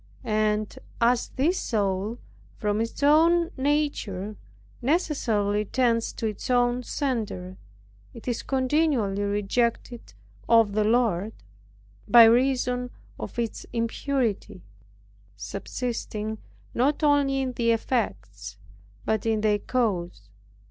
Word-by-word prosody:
And 215 Hz, 0 st, 0 dB, 0.2 s
as 240 Hz, +1 st, +2 dB
this 325 Hz, +8 st, +1 dB
soul, 205 Hz, +1 st, -1 dB, 0.4 s
from 210 Hz, +1 st, 0 dB
its 230 Hz, +5 st, -4 dB
own 335 Hz, +4 st, +4 dB
nature 260 Hz, -9 st, -1 dB, 0.5 s
necessarily 230 Hz, -, 0 dB
tends 230 Hz, 0 st, +1 dB
to -, -, -5 dB
its 215 Hz, +2 st, -4 dB
own 245 Hz, 0 st, +2 dB
center, 220 Hz, -9 st, -3 dB, 0.6 s
it 230 Hz, -, -13 dB
is 240 Hz, -2 st, -1 dB
continually 260 Hz, -7 st, +1 dB
rejected 210 Hz, -, -1 dB, 0.3 s
of 225 Hz, -3 st, +5 dB
the 210 Hz, +1 st, +1 dB
Lord, 220 Hz, -3 st, +1 dB, 0.7 s
by 235 Hz, -1 st, +9 dB
reason 250 Hz, +1 st, +2 dB, 0.3 s
of -, -, -7 dB
its 230 Hz, -2 st, -3 dB
impurity, 230 Hz, -4 st, -2 dB, 0.7 s
subsisting 215 Hz, -, -4 dB, 0.3 s
not 285 Hz, +5 st, +1 dB
only 285 Hz, -2 st, +3 dB
in 260 Hz, -1 st, -2 dB
the 235 Hz, -1 st, 0 dB
effects, 105 Hz, -, -2 dB, 0.5 s
but 220 Hz, 0 st, 0 dB
in 220 Hz, -1 st, +1 dB
their 210 Hz, -1 st, +2 dB
cause. 180 Hz, -, -2 dB
230 Hz, 105 wpm, -26 LUFS, 210-255 Hz, 0.7 s, by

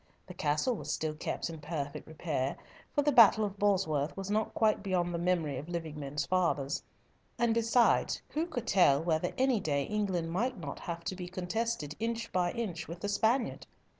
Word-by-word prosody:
The 180 Hz, -, -9 dB
castle 155 Hz, -, +1 dB
was -, -, -5 dB
still 155 Hz, -1 st, -1 dB
kept 155 Hz, -, -3 dB
in 165 Hz, -2 st, -7 dB
perfect 150 Hz, -1 st, -4 dB
repair, 150 Hz, -4 st, -2 dB, 0.4 s
for 290 Hz, -, +3 dB
the 295 Hz, -, +3 dB
battle 220 Hz, -4 st, +7 dB
of 200 Hz, -1 st, -6 dB
Bosworth 180 Hz, -8 st, +1 dB
was 195 Hz, +1 st, -4 dB
not 215 Hz, +1 st, 0 dB
quite 215 Hz, -2 st, +3 dB
beyond 180 Hz, -3 st, 0 dB
the 170 Hz, -, -1 dB
memory 170 Hz, -6 st, 0 dB
of 150 Hz, -, -9 dB
living 165 Hz, -3 st, -4 dB
men's 145 Hz, 0 st, -3 dB
fathers; 170 Hz, -7 st, +1 dB, 0.6 s
and 235 Hz, -1 st, +2 dB
besides, 230 Hz, +1 st, +3 dB
who 315 Hz, +3 st, -1 dB
could 295 Hz, -9 st, -4 dB
tell 155 Hz, -6 st, +4 dB
whether 165 Hz, +1 st, +1 dB
any 260 Hz, -3 st, +3 dB
day 145 Hz, -6 st, 0 dB
England 190 Hz, -4 st, -1 dB
might 235 Hz, +7 st, 0 dB
not 145 Hz, -6 st, -6 dB
have 170 Hz, -1 st, -5 dB
to 185 Hz, -, -3 dB
be 180 Hz, -1 st, -6 dB
contested 185 Hz, -3 st, -2 dB
inch 230 Hz, +1 st, -2 dB
by 180 Hz, -1 st, +1 dB
inch 180 Hz, -9 st, -4 dB
with 170 Hz, +2 st, -8 dB
the 205 Hz, -, -2 dB
Spaniard? 230 Hz, +4 st, +1 dB
180 Hz, 190 wpm, -31 LUFS, 155-220 Hz, 0.6 s, battle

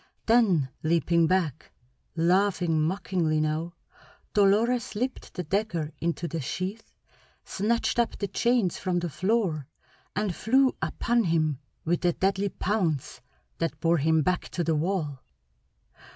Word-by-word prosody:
Then 200 Hz, -, +3 dB
leaping 170 Hz, +1 st, +2 dB
back, 170 Hz, -6 st, -1 dB, 0.4 s
laughing 175 Hz, -1 st, +2 dB
mockingly 165 Hz, -2 st, 0 dB
now, 155 Hz, +3 st, -1 dB, 0.6 s
Dolores 215 Hz, +4 st, +3 dB
slipped 250 Hz, +5 st, -4 dB
the 180 Hz, -, -3 dB
dagger 175 Hz, -4 st, -1 dB
into 170 Hz, 0 st, -1 dB
the 165 Hz, -1 st, -4 dB
sheath, 185 Hz, -, -4 dB, 0.5 s
snatched 225 Hz, +2 st, 0 dB
up 235 Hz, -, +1 dB
the 200 Hz, -, -2 dB
chains 230 Hz, -1 st, +1 dB
from 185 Hz, -2 st, -1 dB
the 175 Hz, -2 st, -2 dB
floor, 185 Hz, -, 0 dB, 0.5 s
and 205 Hz, -2 st, 0 dB
flew 260 Hz, +7 st, +3 dB
upon 235 Hz, -2 st, +1 dB
him 155 Hz, -5 st, +1 dB, 0.3 s
with 170 Hz, +2 st, 0 dB
a 175 Hz, -1 st, +3 dB
deadly 195 Hz, +2 st, 0 dB
pounce 180 Hz, -9 st, -1 dB, 0.4 s
that 165 Hz, -1 st, -2 dB
bore 165 Hz, 0 st, +2 dB
him 160 Hz, +2 st, +3 dB
back 180 Hz, +2 st, -1 dB
to 175 Hz, -, -2 dB
the 165 Hz, -, +1 dB
wall. 155 Hz, -4 st, -1 dB
180 Hz, 130 wpm, -27 LUFS, 160-205 Hz, 0.6 s, Then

